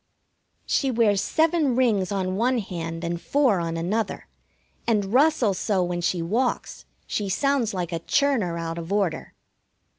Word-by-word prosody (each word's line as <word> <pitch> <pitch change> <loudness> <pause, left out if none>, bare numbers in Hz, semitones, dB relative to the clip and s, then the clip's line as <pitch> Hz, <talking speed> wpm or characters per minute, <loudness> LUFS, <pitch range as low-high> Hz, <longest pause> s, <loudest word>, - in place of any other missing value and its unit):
She 275 - +1
wears 220 -5 +2
seven 320 -5 +2
rings 215 -7 +2
on 185 -2 -1
one 245 +5 +1
hand 165 -5 -5
and 170 0 -3
four 265 -9 +2
on 165 -1 -3
another, 200 +6 -2 0.6
and 210 -3 +1
rustles 260 -8 +3
so 195 -4 +1
when 175 0 -2
she 170 0 0
walks 235 +9 -2 0.2
she 205 -2 -2
sounds 270 +2 +1
like 180 -2 -3
a 165 - -2
churner 215 - +1
out 165 0 -4
of 165 +2 -7
order. 195 -6 -1
200 Hz, 150 wpm, -24 LUFS, 175-250 Hz, 0.6 s, rustles